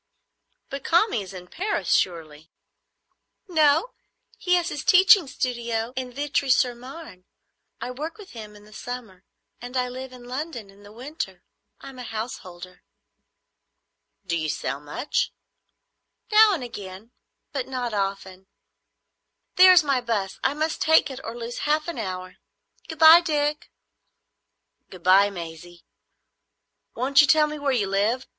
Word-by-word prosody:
"But 275 -1 -6
Kami 345 - +2
is 190 -1 -9
in 180 -2 -9
Paris 400 - -2
surely?" 160 -3 -2 1.0
"No; 315 +5 +2 0.5
he 360 -1 +2
has 350 -1 0
his 290 - -5
teaching 370 -2 +6
studio 235 -2 -3
in 255 -1 -4
Vitry 280 +1 -2
sur 250 -1 +3
Marne. 250 - -12 0.5
I 250 - -5
work 305 +10 -6
with 415 -3 -13
him 215 -3 -10
in 205 0 -16
the 215 - -17
summer, 225 -7 -8 0.4
and 245 +2 -6
I 250 0 0
live 260 +1 -8
in 250 -1 -13
London 250 -4 -6
in 200 +1 -20
the 205 0 -14
winter. 265 +8 -7 0.4
I'm 265 -2 -11
a - - -6
householder." 185 -6 -7 1.4
"Do 170 -2 -1
you 155 -2 -2
sell 140 - -3
much?" 150 - -2 1.0
"Now 425 -1 +6
and 290 - -6
again, 205 -1 -9 0.4
but 270 -4 -3
not 250 -3 -4
often. 195 -1 -4 1.1
There 370 0 +8
is 360 -3 +6
my 275 -3 +1
"bus. 210 -5 -3
I 270 +2 +1
must 310 +1 -2
take 320 -2 +4
it 260 - -7
or 230 +1 -7
lose 235 0 -6
half 305 +1 +1
an 335 -7 -5
hour. 185 -3 -6 0.5
Good 320 - -7
bye, 320 +2 +9
Dick." 300 -3 -1 1.2
"Good 180 -2 -13
bye, 195 +2 +5
Maisie. 170 -1 -10 1.1
Won't 265 +3 +4
you 290 - +3
tell 305 +2 +5
me 300 0 -6
where 285 -1 0
you 235 -6 +1
live? 205 +6 0
250 Hz, 150 wpm, -24 LUFS, 195-300 Hz, 1.4 s, bye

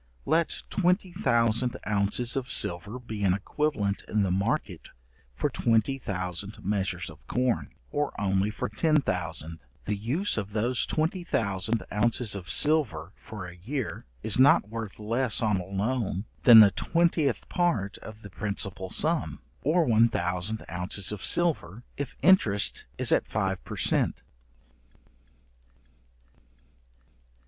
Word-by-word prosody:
Let 160 +2 0
twenty 180 0 +1
thousand 120 - +1
ounces 105 +4 +1
of 135 -2 -3
silver 100 +7 +2
be 110 -4 -6
an 95 -2 +3
equivalent 105 -1 -2
in 105 -1 +1
the 95 - 0
market 100 - -2 0.5
for - - 0
twenty 115 +4 +1
thousand 90 -2 -5
measures 95 -3 -1
of 80 -2 -13
corn, 125 -1 -1 0.2
or 145 0 -1
only 100 0 +1
for 105 - -4
ten 155 +8 +2
thousand, 85 -4 -3 0.3
the 105 - -1
use 130 - -1
of 100 0 -6
those 120 +3 0
twenty 160 +4 -1
thousand 110 - -1
ounces 110 +1 +1
of 90 -4 -7
silver 110 - +2
for 105 -4 -9
a 90 -1 -10
year 120 +8 -5 0.2
is - - +2
not 140 -4 +5
worth 115 -3 -6
less 115 +3 0
on 105 -3 +1
a 90 - -4
loan 100 0 -2 0.2
than 115 -2 +11
the 100 -2 +7
twentieth 160 - 0
part 115 - -1
of 110 0 -11
the 100 - -10
principal 100 -1 -3
sum, - - 0 0.2
or 165 +3 +2
one 115 -1 +4
thousand 90 +3 -2
ounces 90 +3 -1
of 105 -2 -6
silver, 125 - 0
if 140 -2 -5
interest 115 - +4
is - - +2
at - - +2
five 95 -3 -2
per - - -8
cent. - - 0
110 Hz, 140 wpm, -27 LUFS, 95-130 Hz, 0.5 s, than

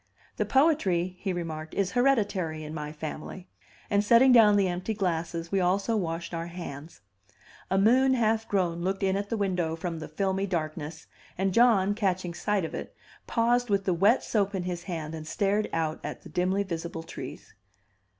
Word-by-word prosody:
"The - - 0
poetry," 195 - +2
he 195 - -2
remarked, 160 -3 -5
"is 195 -2 0
hereditary 200 -11 +1
in 155 0 -7
my 150 -2 -5
family;" 155 +4 -7 0.4
and 205 0 +2
setting 235 +5 +6
down 220 -4 +7
the 200 -2 +3
empty 180 +5 -3
glasses 170 -3 -2
we 195 - +2
also 195 +5 +1
washed 170 -3 -3
our 165 0 -3
hands. 165 - -8 0.7
A 190 - +1
moon 255 +6 +4
half 225 -1 +1
grown 175 -4 0
looked 195 +2 -1
in 190 0 +2
at 200 +1 -3
the 230 - -1
window 180 -5 0
from 165 -1 -4
the 155 - -6
filmy 195 0 -1
darkness, 155 -3 -4 0.3
and 190 0 0
John, 210 -4 +4
catching 185 -4 -1
sight 200 +1 0
of - - -7
it, - - -6 0.3
paused 240 +1 +2
with 200 -1 +1
the 185 - +2
wet 200 +8 +3
soap 200 -2 0
in 185 - -2
his 175 -1 -4
hand 160 -4 -4
and 155 -1 -7
stared 200 +6 0
out 160 -1 -1
at 150 - -6
the - - -11
dimly 185 +3 +1
visible 170 -3 -5
trees. - - -9
185 Hz, 180 wpm, -28 LUFS, 165-205 Hz, 0.7 s, down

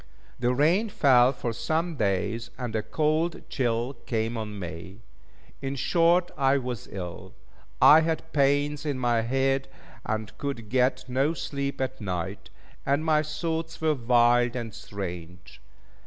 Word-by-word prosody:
The 125 0 +2
rain 165 - +2
fell 130 - +5
for 120 -3 -4
some 160 +8 -1
days 110 +1 -1
and 120 -3 -4
a 110 - +1
cold 155 +8 -1
chill 120 0 -1
came 115 0 -1
on 105 -2 -5
me; 90 +3 -8 0.6
in 135 0 -3
short 170 +6 +2
I 135 0 +3
was 125 -4 -5
ill. 95 +2 -7 0.4
I 155 - +9
had 160 0 -2
pains 145 +1 +2
in 145 -3 -2
my 120 -2 +1
head, 135 +3 0 0.4
and 110 0 -3
could 125 -7 -4
get 130 +1 +1
no 135 +6 +1
sleep 140 -2 -4
at 130 -1 -3
night, 90 -5 -4 0.3
and 140 +3 0
my 155 -1 +4
thoughts 160 +1 -3
were 160 -1 +2
wild 120 -1 +3
and 115 -3 -4
strange. 90 -3 -8
130 Hz, 140 wpm, -27 LUFS, 110-150 Hz, 0.6 s, I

